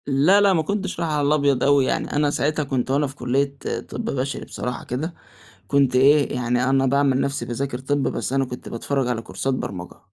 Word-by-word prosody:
لأ، 150 Hz, +9 st, +4 dB
لأ، 200 Hz, -1 st, +5 dB
ما 165 Hz, -, +2 dB
كُنتش 200 Hz, +3 st, -3 dB
رايح 165 Hz, -2 st, -1 dB
على 145 Hz, -1 st, +1 dB
الأبيض 145 Hz, -3 st, +2 dB
أوي 140 Hz, -1 st, +4 dB
يعني -, -, -2 dB
أنا 145 Hz, 0 st, +2 dB
ساعتها 150 Hz, +2 st, 0 dB
كُنت 130 Hz, -2 st, -2 dB
وأنا 145 Hz, +2 st, +2 dB
في 135 Hz, -, -10 dB
كلية 140 Hz, +2 st, -1 dB, 0.3 s
طِب -, -, -5 dB
بشري 135 Hz, +1 st, -3 dB
بصراحة 125 Hz, 0 st, -5 dB
كده، 155 Hz, +8 st, -3 dB, 0.5 s
كُنت 140 Hz, -3 st, +2 dB
إيه 140 Hz, +3 st, +4 dB
يعني 125 Hz, 0 st, 0 dB
أنا 135 Hz, 0 st, +3 dB
باعمل 135 Hz, 0 st, +2 dB
نَفْسي 140 Hz, +1 st, -2 dB
باذاكر 125 Hz, +1 st, -3 dB
طِب 140 Hz, +1 st, -1 dB
بس 130 Hz, -, -2 dB
أنا 135 Hz, 0 st, +2 dB
كُنت 125 Hz, -1 st, -8 dB
باتفرج 135 Hz, +2 st, -2 dB
على 120 Hz, -2 st, -1 dB
كورسات 135 Hz, +3 st, -3 dB
برمجة. 90 Hz, -8 st, -6 dB
140 Hz, 200 wpm, -22 LUFS, 130-145 Hz, 0.5 s, لأ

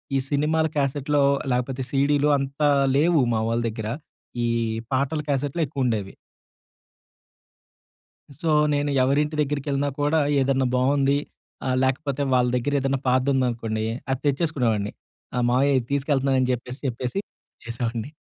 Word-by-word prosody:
ఈ -, -, +3 dB
సినిమాల 155 Hz, +2 st, +1 dB
క్యాసెట్‌లో 140 Hz, +1 st, +1 dB, 0.3 s
లేకపోతే, 125 Hz, +1 st, -1 dB
సీడీలు 145 Hz, +1 st, +2 dB
అంత 140 Hz, +2 st, -5 dB, 0.3 s
లేవు, 160 Hz, 0 st, +4 dB
మావోళ్ళ 115 Hz, +1 st, 0 dB
దెగ్గర. 110 Hz, -1 st, -5 dB, 0.6 s
ఈ -, -, +1 dB, 0.5 s
పాటల 140 Hz, +4 st, 0 dB
క్యాసెట్లే 145 Hz, +4 st, -1 dB
ఎక్కువుండేవి. 120 Hz, -8 st, -2 dB, 2.2 s
సో, 160 Hz, +1 st, -2 dB, 0.2 s
నేను 145 Hz, 0 st, 0 dB
ఎవరింటి 150 Hz, +3 st, +1 dB
దెగ్గిరికెళ్ళినా 145 Hz, -1 st, -1 dB
కూడా, 150 Hz, +2 st, +2 dB, 0.2 s
ఏదన్నా 135 Hz, 0 st, +1 dB
బావుంది 140 Hz, +2 st, +2 dB, 0.5 s
ఆహ్, 130 Hz, 0 st, +1 dB
లేకపోతే 140 Hz, +1 st, 0 dB
వాళ్ళ 125 Hz, -1 st, +3 dB
దెగ్గరేదన్నా 135 Hz, +1 st, 0 dB
పాతదుందనుకోండీ, 125 Hz, -4 st, +1 dB, 0.2 s
అది 135 Hz, -1 st, 0 dB
తెచ్చేసుకునేవాడిని. 125 Hz, -9 st, 0 dB, 0.4 s
ఆ! -, -, -1 dB
మావయ్యా 135 Hz, +3 st, +3 dB
ఇది 120 Hz, -, -8 dB
తీసుకెళ్తున్నానని 135 Hz, -2 st, +1 dB
జెప్పేసి 125 Hz, +2 st, -4 dB
చెప్పేసి 125 Hz, +7 st, -3 dB, 0.4 s
వచేసేవాడిని. 115 Hz, +1 st, -4 dB
135 Hz, 110 wpm, -24 LUFS, 125-145 Hz, 2.2 s, లేవు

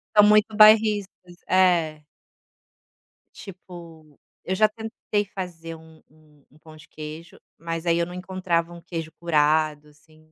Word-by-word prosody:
São 210 Hz, -, +8 dB
muito 210 Hz, +1 st, +4 dB
bairristas, 210 Hz, -4 st, +4 dB
é. 170 Hz, -5 st, +2 dB, 1.3 s
Tipo, 170 Hz, -5 st, -13 dB, 0.3 s
eu 190 Hz, -, -2 dB
já 215 Hz, +2 st, +4 dB
tentei 215 Hz, -1 st, -4 dB
fazer 175 Hz, -4 st, -8 dB
um 160 Hz, 0 st, -18 dB
um 150 Hz, -2 st, -26 dB
um 150 Hz, -, -23 dB
pão 155 Hz, 0 st, -15 dB
de 155 Hz, -, -17 dB
queijo, 160 Hz, +5 st, -10 dB, 0.2 s
mas 165 Hz, +1 st, -5 dB
aí 170 Hz, 0 st, +3 dB
eu 170 Hz, -, 0 dB
não 175 Hz, -, -10 dB
encontrava 180 Hz, -2 st, -2 dB
um 170 Hz, 0 st, -11 dB
queijo 165 Hz, -2 st, -6 dB
curado, 155 Hz, -2 st, +1 dB
assim. 155 Hz, +1 st, -24 dB
170 Hz, 140 wpm, -24 LUFS, 155-190 Hz, 1.3 s, São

